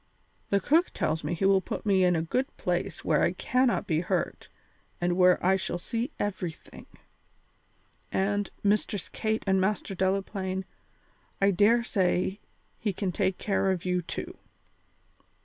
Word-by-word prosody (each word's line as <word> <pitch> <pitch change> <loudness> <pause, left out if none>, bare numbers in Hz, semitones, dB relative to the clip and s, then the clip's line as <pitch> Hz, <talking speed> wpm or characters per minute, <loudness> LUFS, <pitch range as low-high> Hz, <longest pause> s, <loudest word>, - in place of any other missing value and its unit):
The 200 - +3
cook 325 - +3
tells 160 -1 -1
me 155 +4 -1
he 180 - -1
will 195 -1 +5
put - - -5
me 195 -3 +4
in 180 -1 +4
a 160 - 0
good 255 +11 0
place - - -2
where - - +3
I - - +2
cannot 255 -1 +1
be 160 -3 +1
hurt 180 - -2 0.5
and 175 0 +1
where 180 0 +5
I 190 +1 +4
shall 185 - -3
see 230 +8 -3
everything. 185 -5 -5 1.2
And, 205 +1 0
Mistress 205 -1 0
Kate 220 0 -2
and 190 -1 +3
Master 195 0 -1
Delaplaine, 190 0 -1 0.7
I 195 0 +4
dare 215 +5 +4
say 190 -2 0 0.4
he 210 -4 -1
can 185 0 -2
take 190 0 0
care 195 -1 0
of 185 -2 -1
you 180 0 +1
too." 165 - -6
190 Hz, 150 wpm, -28 LUFS, 180-205 Hz, 1.2 s, will